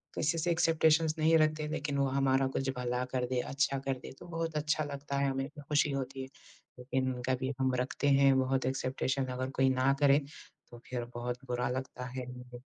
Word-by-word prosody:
किसी 160 Hz, +2 st, +1 dB
से 170 Hz, +2 st, +1 dB
एक्सपेकटेशन्स 160 Hz, -1 st, +3 dB
नहीं 160 Hz, +1 st, +5 dB
रखते 155 Hz, 0 st, +2 dB
लेकिन 150 Hz, -2 st, -2 dB
वो 140 Hz, -, +3 dB
हमारा 135 Hz, 0 st, +2 dB
कुछ 135 Hz, 0 st, -2 dB
भला 125 Hz, 0 st, -1 dB
कर 125 Hz, -1 st, +1 dB
दे, 125 Hz, 0 st, 0 dB
अच्छा 140 Hz, +1 st, 0 dB
कर 135 Hz, 0 st, -1 dB
दे -, -, -9 dB
तो -, -, -11 dB
बहुत 165 Hz, -1 st, -3 dB
अच्छा 155 Hz, +1 st, +1 dB
लगता 140 Hz, -1 st, -4 dB
है, 140 Hz, 0 st, +2 dB
हमें 135 Hz, 0 st, -2 dB
तो 150 Hz, 0 st, -12 dB
खुशी 150 Hz, 0 st, +3 dB
होती 135 Hz, -1 st, -3 dB
है। -, -, -7 dB, 0.5 s
लेकिन 130 Hz, +1 st, -1 dB
उनका 125 Hz, +1 st, -1 dB
भी 130 Hz, +1 st, -1 dB
हम 130 Hz, -1 st, +2 dB
रखते 125 Hz, +3 st, -1 dB
हैं 135 Hz, -1 st, +6 dB
बहुत 130 Hz, 0 st, +1 dB
एक्सपेकटेशन्स 130 Hz, 0 st, -1 dB
अगर 130 Hz, +1 st, -3 dB
कोई 135 Hz, 0 st, +5 dB
ना 130 Hz, +1 st, +3 dB
करे, 140 Hz, 0 st, +5 dB, 0.5 s
तो 120 Hz, -, -11 dB
फिर 125 Hz, -2 st, -3 dB
बहुत 125 Hz, +2 st, -4 dB
बुरा 125 Hz, 0 st, 0 dB
लगता 130 Hz, 0 st, -4 dB
है 125 Hz, 0 st, -5 dB
हमको। 125 Hz, 0 st, -10 dB
135 Hz, 205 wpm, -32 LUFS, 130-145 Hz, 0.5 s, हैं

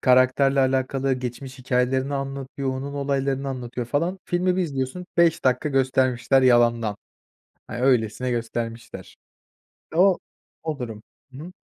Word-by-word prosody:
karakterle 130 Hz, +2 st, +4 dB
alakalı 135 Hz, +1 st, +1 dB
geçmiş 130 Hz, +1 st, -5 dB
hikâyelerini 130 Hz, +2 st, 0 dB
anlatıyor, 135 Hz, 0 st, -4 dB
onun 135 Hz, +2 st, -5 dB
olaylarını 140 Hz, -1 st, -1 dB
anlatıyor, 125 Hz, -2 st, -5 dB
falan. 165 Hz, +9 st, -1 dB
Filmi 180 Hz, +1 st, +1 dB
bir 185 Hz, -, +2 dB
izliyorsun, 140 Hz, +2 st, -3 dB
5 170 Hz, -1 st, +3 dB
dakika 130 Hz, +3 st, +2 dB
göstermişler, 130 Hz, -1 st, +2 dB
yalandan, 120 Hz, -4 st, +3 dB, 0.7 s
hani, 120 Hz, -, -6 dB
öylesine 125 Hz, -1 st, +2 dB
göstermişler. 115 Hz, -1 st, -5 dB, 0.8 s
O 185 Hz, +2 st, +5 dB, 0.4 s
o 155 Hz, -3 st, -3 dB
durum. 115 Hz, -4 st, -6 dB, 0.3 s
Hı 130 Hz, -, -10 dB
hı. 170 Hz, +5 st, -9 dB
130 Hz, 125 wpm, -24 LUFS, 125-140 Hz, 0.8 s, O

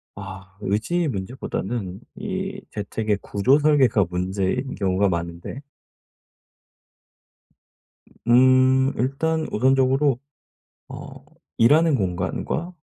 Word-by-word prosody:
아 95 Hz, -1 st, -10 dB
의지의 125 Hz, -, 0 dB
문제보다는 100 Hz, -2 st, -4 dB, 0.2 s
이 195 Hz, 0 st, -4 dB
재택의 105 Hz, 0 st, -2 dB
구조 130 Hz, +9 st, +2 dB
설계가 135 Hz, -, +4 dB
문제인 95 Hz, +8 st, -2 dB
경우가 95 Hz, 0 st, +1 dB
많은데 85 Hz, -, -5 dB, 2.5 s
으 -, -, -25 dB, 0.2 s
음. 130 Hz, +2 st, +5 dB
일단 155 Hz, +5 st, 0 dB
우선적으로 135 Hz, +2 st, +3 dB, 0.7 s
어 -, -, -10 dB, 0.3 s
일하는 150 Hz, +6 st, +5 dB
공간과 95 Hz, -, -2 dB
125 Hz, 200 characters per minute, -23 LUFS, 95-140 Hz, 2.5 s, 음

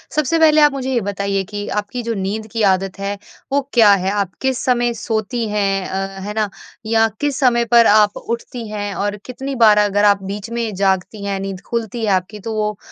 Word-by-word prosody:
सबसे 305 Hz, +2 st, +1 dB
पहले 310 Hz, -1 st, +5 dB
आप 295 Hz, 0 st, +6 dB
मुझे 265 Hz, -1 st, -3 dB
ये 240 Hz, -, +1 dB
बताइए 200 Hz, 0 st, -2 dB
कि 205 Hz, +1 st, -6 dB
आपकी 210 Hz, +4 st, -3 dB
जो 230 Hz, -, -2 dB
नींद 210 Hz, +2 st, -3 dB
की 225 Hz, -, -2 dB
आदत 190 Hz, +1 st, -2 dB
है 200 Hz, +1 st, -3 dB, 0.3 s
वो 280 Hz, -, +2 dB
क्या 225 Hz, -4 st, +6 dB
है? 190 Hz, 0 st, 0 dB
आप 200 Hz, -2 st, -1 dB
किस 265 Hz, -2 st, 0 dB
समय 240 Hz, -1 st, +2 dB
सोती 225 Hz, +1 st, -2 dB
हैं? 195 Hz, -2 st, 0 dB
अ, 195 Hz, 0 st, -4 dB
है 210 Hz, -, -4 dB
ना? 215 Hz, -1 st, 0 dB, 0.4 s
या 225 Hz, 0 st, +3 dB
किस 290 Hz, -2 st, -1 dB
समय 240 Hz, -3 st, +3 dB
पर 235 Hz, 0 st, +5 dB
आप 210 Hz, 0 st, +4 dB
उठती 235 Hz, 0 st, -5 dB
हैं 205 Hz, -1 st, -4 dB
और 205 Hz, +1 st, -2 dB
कितनी 270 Hz, +2 st, -5 dB
बार 220 Hz, -4 st, +6 dB
अगर 205 Hz, 0 st, +3 dB
आप 200 Hz, -1 st, +3 dB
बीच 200 Hz, +3 st, -6 dB
में 230 Hz, -2 st, -3 dB
जागती 195 Hz, +2 st, 0 dB
हैं 200 Hz, -1 st, -2 dB
नींद 195 Hz, -1 st, -5 dB
खुलती 230 Hz, 0 st, -3 dB
है 205 Hz, -, +1 dB
आपकी 190 Hz, +3 st, -1 dB
तो 220 Hz, +3 st, -5 dB
वो 210 Hz, -1 st, -1 dB
210 Hz, 215 wpm, -19 LUFS, 200-235 Hz, 0.4 s, आप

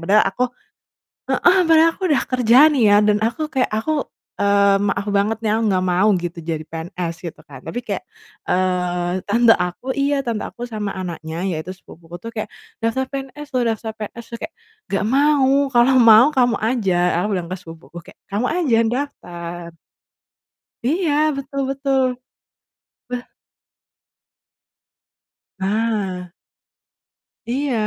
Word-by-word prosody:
padahal 200 Hz, +6 st, +4 dB
aku 195 Hz, +6 st, -2 dB, 0.9 s
heeh, 360 Hz, +2 st, +4 dB
padahal 325 Hz, 0 st, +6 dB
aku -, -, -17 dB
udah 295 Hz, -4 st, +2 dB
kerja 245 Hz, -2 st, +4 dB, 0.2 s
nih 270 Hz, -5 st, +1 dB
ya, 205 Hz, -, +6 dB
dan 210 Hz, 0 st, +3 dB
aku 240 Hz, +7 st, -1 dB
kayak 260 Hz, -3 st, +1 dB
aku, 220 Hz, +9 st, -1 dB, 0.5 s
eee, 200 Hz, 0 st, +4 dB
maaf 200 Hz, +1 st, -2 dB
banget 210 Hz, +3 st, +1 dB
nih, 220 Hz, -2 st, -1 dB
aku 225 Hz, -, -1 dB
nggak 185 Hz, -1 st, +1 dB
mau 180 Hz, +4 st, +3 dB
gitu 175 Hz, 0 st, -5 dB
jadi 160 Hz, -1 st, -3 dB
PNS, 170 Hz, +1 st, -5 dB
gitu 170 Hz, -, -7 dB
kan, 135 Hz, -3 st, -12 dB
tapi 245 Hz, -, -4 dB
kayak, 200 Hz, -3 st, -3 dB, 0.4 s
eee, 180 Hz, 0 st, -1 dB
tante 235 Hz, +2 st, +4 dB
aku 180 Hz, +7 st, -4 dB
iya, 280 Hz, 0 st, +1 dB
tante 235 Hz, -5 st, -3 dB
aku 235 Hz, -, -9 dB
sama 210 Hz, -3 st, -4 dB
anaknya, 165 Hz, -3 st, -6 dB
yaitu 170 Hz, +1 st, -4 dB
sepupuku 175 Hz, -2 st, -13 dB
tuh, 230 Hz, -, -7 dB
kayak, 215 Hz, -, -4 dB, 0.3 s
"Daftar 230 Hz, +4 st, 0 dB
PNS 275 Hz, +2 st, -7 dB
loh 250 Hz, -, +2 dB
daftar 220 Hz, 0 st, -5 dB
PNS 220 Hz, +2 st, -7 dB
loh!" -, -, -17 dB
Kayak, 330 Hz, -, -8 dB, 0.4 s
"Gak 195 Hz, -, +1 dB
mau, 285 Hz, -2 st, +4 dB, 0.2 s
kalau 245 Hz, +2 st, +5 dB
mau, 230 Hz, -1 st, +8 dB
kamu 245 Hz, -2 st, +3 dB
aja," 220 Hz, -4 st, 0 dB, 0.3 s
aku -, -, +1 dB
bilang 180 Hz, -3 st, -2 dB
ke 185 Hz, -, -4 dB
sepupuku 165 Hz, 0 st, -12 dB
kayak, -, -, -16 dB
"Kamu 205 Hz, +4 st, -2 dB
aja 315 Hz, -10 st, +2 dB
daftar." 175 Hz, -9 st, -5 dB, 1.1 s
Iya, 320 Hz, +6 st, +1 dB, 0.2 s
betul 275 Hz, 0 st, -4 dB
betul. 270 Hz, -1 st, +1 dB, 1.1 s
Beh 245 Hz, 0 st, -4 dB, 2.4 s
Nah. 195 Hz, -3 st, -2 dB, 1.2 s
Iya, 270 Hz, +2 st, -1 dB
215 Hz, 140 wpm, -20 LUFS, 180-255 Hz, 2.4 s, mau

